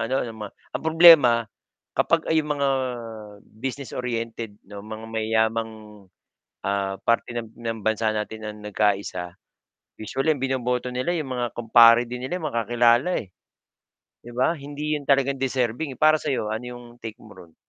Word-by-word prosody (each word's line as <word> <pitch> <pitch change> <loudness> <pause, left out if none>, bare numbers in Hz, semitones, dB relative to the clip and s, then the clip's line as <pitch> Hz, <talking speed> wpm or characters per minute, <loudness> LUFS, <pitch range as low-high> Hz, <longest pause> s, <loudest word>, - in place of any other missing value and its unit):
ano 130 +4 0
mga 110 -3 -7 0.2
ang - - -4
problema 160 -6 +8 0.6
kapag 165 -1 +2
ay 160 - +4
mga 145 -2 -1 0.8
business-oriented 115 -3 -5
'no, 100 0 -9
mga 110 +2 -8
mayayamang 110 0 0 0.9
ah, 100 0 -1
parte 115 +1 0
ng 115 -2 -5
ng 115 -1 -4
bansa 110 0 +1
natin 110 0 -4
ang 105 0 -7
nagkaisa, 100 -4 -1 0.7
usually 135 +8 0
ang 145 - -2
binoboto 125 -1 -1
nila 130 +7 0
yung 135 -6 -3
mga 120 -1 -2
kumpare 115 +1 +6
din 125 +1 -6
nila, 180 +8 -3
eh, - - -10
mga - - 0
makakilala, 120 - +3
eh. 100 - -9 0.9
'Di 120 - -12
ba 130 +6 +3
hindi 150 0 -4
yun 140 - -15
talagang 140 0 +3
deserving, 130 +1 -1
para 155 0 +4
sa'yo 125 -8 -2
ano 110 +3 -4
yung 120 - -11 0.2
take 110 -1 -7
mo 110 - -14
ron? 85 -2 -15
120 Hz, 155 wpm, -24 LUFS, 110-135 Hz, 0.9 s, problema